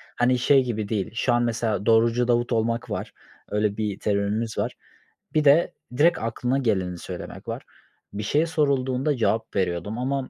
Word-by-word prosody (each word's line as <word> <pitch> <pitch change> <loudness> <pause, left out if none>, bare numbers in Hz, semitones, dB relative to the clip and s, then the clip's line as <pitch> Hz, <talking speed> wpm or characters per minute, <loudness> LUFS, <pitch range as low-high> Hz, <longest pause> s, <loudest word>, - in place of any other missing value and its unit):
hani, 125 +1 +3
şey 135 +1 +4
gibi 110 -4 -3
değil. 100 -5 -2
Şu 115 - +1
an 120 0 +2
mesela 115 -3 -1
"Doğrucu 115 +2 +3
Davut" 120 0 +1
olmak 115 +1 0
var, - - -4 0.4
öyle 105 -1 0
bir 105 -2 -2
terimimiz 105 +2 -1
var. - - -1 0.6
Bir 155 -1 +3
de 145 +5 +5 0.2
direkt 170 +4 +4
aklına 125 +3 -1
geleni 95 -8 0
söylemek - - -8
var. - - -5 0.5
Bir 105 +1 -4
şey 150 +10 +2
sorulduğunda 140 -3 0
cevap 110 0 0
veriyordum 95 +2 -1
ama 135 +1 -2
115 Hz, 165 wpm, -24 LUFS, 105-130 Hz, 0.6 s, de